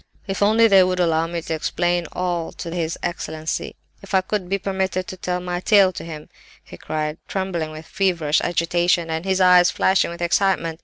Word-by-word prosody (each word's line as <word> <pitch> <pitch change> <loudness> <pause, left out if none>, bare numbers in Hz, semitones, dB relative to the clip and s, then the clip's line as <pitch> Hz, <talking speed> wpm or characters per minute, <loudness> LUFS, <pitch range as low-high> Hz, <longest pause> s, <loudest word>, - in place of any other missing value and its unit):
"'If 195 -1 -4
only 220 +3 +5
they 195 -3 +6
would 185 0 -1
allow 165 -2 +2
me 170 -1 -4
to 160 - -3
explain 175 +2 -1
all 175 -2 -2
to 170 - -7
his 165 -2 -2
excellency! 160 -2 -4 0.3
If 195 0 -4
I 190 - +5
could 195 0 -3
but - - -14
be 195 - +1
permitted 190 -1 -2
to 185 - -7
tell 180 0 -3
my 180 0 -3
tale 195 0 +4
to - - -8
him!" 155 -2 -8 0.4
he - - -12
cried, 155 0 -4
trembling 190 -5 -3
with 155 +1 -10
feverish 165 -5 0
agitation, 175 0 +1
and 160 +2 -3
his 190 0 +1
eyes 180 -1 +6
flashing 190 -2 +2
with 170 0 -8
excitement. 175 -2 +1
175 Hz, 200 wpm, -21 LUFS, 165-190 Hz, 0.4 s, they